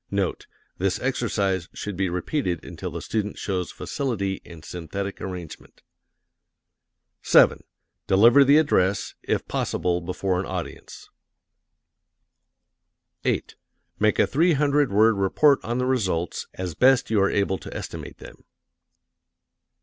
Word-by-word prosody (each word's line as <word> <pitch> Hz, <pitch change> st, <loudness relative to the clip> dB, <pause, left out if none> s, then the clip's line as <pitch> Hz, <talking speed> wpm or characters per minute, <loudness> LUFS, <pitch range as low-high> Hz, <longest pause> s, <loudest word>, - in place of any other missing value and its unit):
NOTE: 100 Hz, -2 st, -2 dB, 0.3 s
This 95 Hz, 0 st, 0 dB
exercise 100 Hz, -8 st, -1 dB
should 105 Hz, -2 st, -5 dB
be 95 Hz, 0 st, 0 dB
repeated 90 Hz, -, -2 dB
until -, -, -6 dB
the -, -, -6 dB
student 105 Hz, -2 st, -3 dB
shows 95 Hz, -3 st, -2 dB
facility 100 Hz, -8 st, -3 dB
in 85 Hz, -3 st, -13 dB
synthetic 100 Hz, +5 st, -6 dB
arrangement. 90 Hz, -4 st, -8 dB, 1.4 s
7. -, -, +5 dB, 0.4 s
Deliver 115 Hz, +8 st, +6 dB
the 140 Hz, +2 st, +6 dB
address, 100 Hz, -11 st, +1 dB
if -, -, -2 dB
possible 90 Hz, 0 st, -1 dB
before 90 Hz, +1 st, -2 dB
an 95 Hz, -, -3 dB
audience. 90 Hz, -3 st, -7 dB, 2.2 s
8. -, -, -1 dB, 0.5 s
Make 105 Hz, 0 st, +2 dB
a -, -, +4 dB
three 165 Hz, +5 st, +2 dB
hundred 145 Hz, -2 st, +2 dB
word 110 Hz, +1 st, +4 dB
report 140 Hz, +9 st, +3 dB
on 120 Hz, +2 st, -2 dB
the 125 Hz, -, 0 dB
results, 95 Hz, -10 st, -1 dB
as 90 Hz, -2 st, -4 dB
best 130 Hz, +4 st, +3 dB
you 105 Hz, -3 st, +3 dB
are 100 Hz, -, +3 dB
able 100 Hz, -2 st, 0 dB
to -, -, -10 dB
estimate -, -, -7 dB
them. -, -, -13 dB
100 Hz, 125 wpm, -24 LUFS, 90-125 Hz, 2.2 s, Deliver